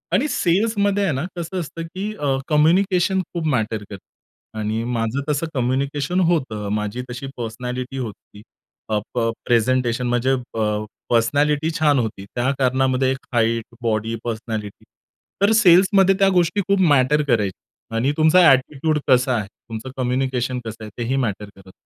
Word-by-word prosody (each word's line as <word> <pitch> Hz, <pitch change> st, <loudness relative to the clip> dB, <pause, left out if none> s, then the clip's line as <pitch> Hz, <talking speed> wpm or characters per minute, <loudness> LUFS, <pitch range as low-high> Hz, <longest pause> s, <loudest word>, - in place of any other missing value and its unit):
आणि 295 Hz, -, +2 dB
सेल्समध्ये 205 Hz, +1 st, +1 dB
आहे 185 Hz, -, +1 dB
ना 135 Hz, +4 st, -2 dB
कसं 175 Hz, +2 st, -4 dB
असतं, 165 Hz, 0 st, -6 dB
की 190 Hz, +6 st, -5 dB
अ, 140 Hz, -5 st, 0 dB
कम्युनिकेशन 180 Hz, +4 st, +3 dB
खूप 170 Hz, -2 st, -3 dB
मॅटर 110 Hz, -4 st, -1 dB
करतं 100 Hz, +2 st, -15 dB
आणि 110 Hz, +2 st, -2 dB
माझं 120 Hz, +2 st, -1 dB
तसं 150 Hz, +2 st, 0 dB
कम्युनिकेशन 140 Hz, +6 st, -1 dB
होतं. 120 Hz, -11 st, -1 dB
माझी 105 Hz, +3 st, -2 dB
तशी 125 Hz, +3 st, -6 dB
पर्सनॅलिटी 125 Hz, +3 st, -5 dB
होती. 110 Hz, -4 st, -8 dB, 0.5 s
अ, 105 Hz, -1 st, +1 dB
प 115 Hz, -2 st, +1 dB, 0.2 s
प्रेझेंटेशन 125 Hz, +1 st, +1 dB
म्हणजे 120 Hz, +2 st, +1 dB
अ, 110 Hz, -4 st, -2 dB, 0.2 s
पर्सनॅलिटी 145 Hz, +7 st, +2 dB
छान 145 Hz, -3 st, +3 dB
होती. 110 Hz, -4 st, -3 dB
त्या 125 Hz, +2 st, +1 dB
कारणामध्ये 130 Hz, 0 st, +2 dB
एक 135 Hz, -, -5 dB
हाईट, 115 Hz, 0 st, +1 dB, 0.2 s
बॉडी, 115 Hz, 0 st, -1 dB
पर्सनॅलिटी. 110 Hz, -3 st, -5 dB, 0.6 s
तर 200 Hz, +2 st, +4 dB
सेल्समध्ये 195 Hz, -2 st, +5 dB
त्या 195 Hz, 0 st, +5 dB
गोष्टी 175 Hz, +3 st, +2 dB
खूप 200 Hz, 0 st, +2 dB
मॅटर 145 Hz, +2 st, +4 dB
करायची 105 Hz, -6 st, 0 dB, 0.4 s
आणि 130 Hz, +5 st, +1 dB
तुमचा 160 Hz, +4 st, +5 dB
ॲटिट्यूड 150 Hz, +3 st, +2 dB
कसा 130 Hz, -1 st, +3 dB
आहे? 105 Hz, -, -3 dB, 0.2 s
तुमचं 115 Hz, +3 st, -6 dB
कम्युनिकेशन 130 Hz, 0 st, -1 dB
कसं 110 Hz, 0 st, -7 dB
आहे? 105 Hz, -, -7 dB
तेही 120 Hz, +2 st, -1 dB
मॅटर 105 Hz, -5 st, -2 dB
करतं. 95 Hz, -1 st, -16 dB
130 Hz, 150 wpm, -21 LUFS, 115-155 Hz, 0.6 s, सेल्समध्ये